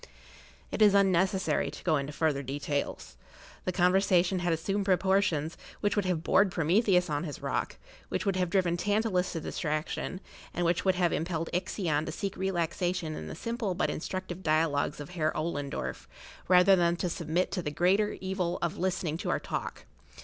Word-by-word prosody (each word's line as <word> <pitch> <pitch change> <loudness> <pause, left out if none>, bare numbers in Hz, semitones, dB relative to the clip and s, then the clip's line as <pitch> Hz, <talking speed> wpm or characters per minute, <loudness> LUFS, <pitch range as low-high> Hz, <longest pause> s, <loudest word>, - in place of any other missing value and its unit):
It - - -3
is 205 -2 +7
unnecessary 190 -5 +2
to 150 - -10
go 160 -4 +3
into 140 +1 -3
further 150 -2 0
details. 140 +1 -3 0.5
The 185 - +1
conversation 185 0 +3
had 175 -1 0
assumed 195 +5 -1
proportions 190 -5 +2 0.2
which 205 - 0
would 205 -2 +1
have 175 -3 0
bored 195 +3 +4
Prometheus 180 +3 +3
on 145 -1 -1
his 150 -4 -6
rock, - - -2 0.3
which - - -2
would 195 -2 +1
have 180 -2 0
driven 175 -2 +1
Tantalus 205 -1 +1
to 165 - -2
distraction, 155 +4 -3 0.4
and 175 - 0
which 170 0 +1
would 190 -1 +3
have 175 -2 +2
impelled 165 0 -2
Ixion 175 -4 -1
to - - -2
seek 200 -3 -4
relaxation 175 -2 -1
in 80 - -6
the 80 - -6
simple 230 -5 -3
but - - 0
instructive 185 +2 -5
dialogues 155 -3 +1
of 145 +3 -8
Herr 155 -3 0
Ollendorff, 145 -3 -3 0.4
rather 185 +2 +6
than 170 -1 +2
submit 170 0 -1
to 190 - -1
the 155 - -3
greater 190 +7 +2
evil 190 -2 -2
of 170 - -2
listening 175 -3 -1
to - - -4
our - - +1
talk. - - -5
175 Hz, 170 wpm, -29 LUFS, 160-190 Hz, 0.5 s, is